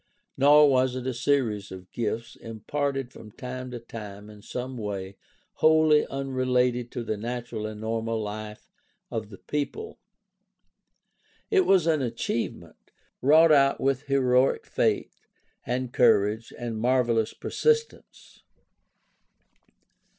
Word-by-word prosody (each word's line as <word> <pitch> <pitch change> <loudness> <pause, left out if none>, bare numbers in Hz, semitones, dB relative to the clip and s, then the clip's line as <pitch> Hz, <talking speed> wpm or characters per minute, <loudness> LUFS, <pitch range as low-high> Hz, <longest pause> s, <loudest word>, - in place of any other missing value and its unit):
Nor 145 +2 +6
was 130 -2 +2
it 130 -1 -5
a 130 - -1
series 120 -6 0
of 95 -1 -10
gifts, 115 +1 -3
imparted 135 +4 -4
from 110 - -12
time 130 +2 -7
to 125 - -6
time 105 -3 -9
in 105 -1 -14
some 125 +4 -6
way 100 -4 -5 0.4
wholly 155 -1 +4
unrelated 125 -3 0
to 120 - -3
the 110 -1 -3
natural 115 -1 -4
and 110 0 -8
normal 115 0 -2
life 105 0 -7 0.4
of 110 -2 -4
the 100 - -11
people. 150 - -4 1.5
It 385 -3 +3
was 190 -4 +4
an 160 -3 +2
achieve 115 -1 -2
ment, - - -18 0.3
wrought 155 +4 +6
out 140 -2 +4
with 135 -1 0
heroic 130 -1 +2
faith - - -1 0.4
and 125 0 -2
courage 110 -1 +3
and 115 -2 -4
mar 125 +2 +3
velous 115 -2 -1
persistence. 460 0 -2
125 Hz, 125 wpm, -26 LUFS, 110-135 Hz, 1.5 s, Nor